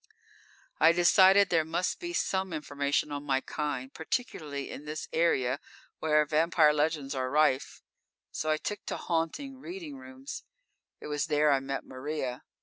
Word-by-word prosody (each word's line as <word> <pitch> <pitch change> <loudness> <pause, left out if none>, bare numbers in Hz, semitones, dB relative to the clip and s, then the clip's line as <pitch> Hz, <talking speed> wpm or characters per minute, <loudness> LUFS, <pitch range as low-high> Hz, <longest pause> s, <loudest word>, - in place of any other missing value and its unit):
_ - - +2
_I 165 +1 +7
decided 190 +3 +6
there 165 -2 +3
must 165 +3 -1
be 345 0 -4
some 190 - -1
information 145 -1 -1
on 145 0 -3
my 135 -2 +1
kind, 140 -2 -4
particularly 155 - -3
in 145 - -8
this 150 +1 -5
area 140 -5 +2 0.4
where 150 -1 +3
vampire 155 0 +4
legends 150 -2 0
are 130 -1 -2
rife, 145 -2 +1 0.5
so 155 - -3
I 155 - +3
took 205 +5 -5
to - - -2
haunting 185 - -2
reading 335 -1 -7
rooms. 265 +2 -9 0.6
It - - -10
was 150 -1 -1
there 150 0 +3
I 135 - +4
met 135 +1 -4
Maria. 130 -1 -4
155 Hz, 155 wpm, -29 LUFS, 145-175 Hz, 0.6 s, I